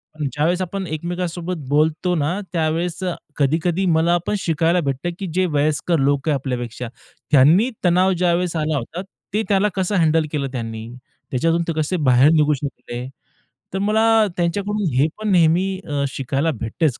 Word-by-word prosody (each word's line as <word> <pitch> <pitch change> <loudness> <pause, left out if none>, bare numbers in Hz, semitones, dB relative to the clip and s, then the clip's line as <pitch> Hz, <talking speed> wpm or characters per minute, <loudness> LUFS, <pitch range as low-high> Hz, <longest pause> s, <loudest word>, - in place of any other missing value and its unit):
आणि 150 -2 -2
ज्यावेळेस 165 +6 +1
आपण 190 +2 -3
एकमेकांसोबत 175 +2 -3
बोलतो 155 +5 +2
ना, 165 +5 0
त्यावेळेस, 165 +2 -1
अ, 180 -2 -1 0.2
कधी-कधी 160 +6 +1
मला 170 +2 +3
पण - - +1
शिकायला 165 +1 +1
भेटतं, 140 +3 -2
की 195 - -4
जे 185 +1 +2
वयस्कर 155 +3 +1
लोक 140 +2 +1
आहेत 145 -3 +1
आपल्यापेक्षा, 125 -2 -4 0.4
त्यांनी 155 - +5 0.2
तणाव 180 +2 +4
ज्यावेळेस 175 0 +1
आला 155 -1 0
होता, 155 +8 -5 0.3
ते 215 +1 +1
त्याला 200 +1 +3
कसं 190 +1 0
हँडल 160 0 +2
केलं 140 -3 -1
त्यांनी, 115 -2 -5 0.4
त्याच्यातून 165 +6 +1
ते 165 - 0
कसे 170 +5 -1
बाहेर 125 +3 +6
निघू 150 -2 +3
शकले. 130 -3 -6 0.7
तर 190 - -1
मला 215 +3 +2 0.3
त्यांच्याकडून 200 +4 -1
हे 135 +4 +4
पण 215 -1 -2
नेहमी, 175 +1 +4 0.2
अ, 145 -1 -1
शिकायला 135 +4 -1
भेटतंच 125 +4 -1
165 Hz, 160 wpm, -21 LUFS, 145-180 Hz, 0.7 s, बाहेर